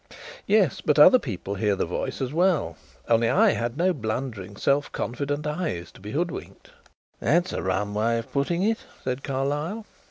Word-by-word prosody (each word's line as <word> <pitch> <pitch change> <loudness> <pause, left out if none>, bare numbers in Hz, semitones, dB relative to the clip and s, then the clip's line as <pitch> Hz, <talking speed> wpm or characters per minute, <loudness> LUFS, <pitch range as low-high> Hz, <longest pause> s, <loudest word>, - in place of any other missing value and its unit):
"Yes; - - +3
but - - +2
other 255 -2 +8
people 100 - -5
heard 100 0 0
the - - 0
voice - - -4
as 130 +2 -3
well. 165 - +2 0.3
Only 115 0 +3
I 215 +1 +5
had 120 +3 -2
no 180 +2 +2
blundering, 110 - -4
self 140 +1 +1
confident 145 +6 -3
eyes 150 - -3
to - - -17
be 105 - -8
hoodwinked." 175 - -4 0.5
"That's 175 +2 +2
a - - -2
rum 95 +2 -1
way 115 +3 +1
of 115 - -6
putting 170 +6 0
it," 225 +2 +1 0.2
said 130 +1 -3
Carlyle. 145 +10 -2
135 Hz, 170 wpm, -25 LUFS, 110-170 Hz, 0.5 s, other